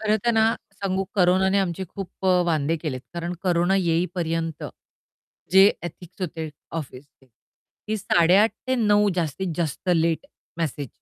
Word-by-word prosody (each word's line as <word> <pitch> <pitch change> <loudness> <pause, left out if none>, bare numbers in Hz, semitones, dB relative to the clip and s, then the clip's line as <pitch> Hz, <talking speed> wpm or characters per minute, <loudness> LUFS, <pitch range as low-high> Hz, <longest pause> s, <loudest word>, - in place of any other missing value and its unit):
खरं 215 0 +2
तर 240 - +4
ना 225 0 +3 0.2
सांगू, 195 -1 -2
कोरोनाने 190 +1 +3
आमचे 190 -1 -1
खूप 195 0 -7 0.2
अ, 180 -1 +4
वांदे 160 -1 +1
केलेत. 150 -5 -4
कारण 170 +1 -3
कोरोना 175 0 +2
येईपर्यंत 165 -2 -1 0.9
जे 190 +1 +8 0.2
एथिक्स 175 +2 -9
होते 160 -2 -4 0.3
ऑफिसचे 135 -1 -11 0.6
की 215 +1 -1
8:30 190 +2 +4 0.2
ते 260 - +1
9:00 210 -3 +3
जास्तीत 175 +2 -2
जास्त 170 +1 -3
लेट 165 - +1 0.3
मेसेज 145 -4 -2
175 Hz, 135 wpm, -24 LUFS, 165-195 Hz, 0.9 s, जे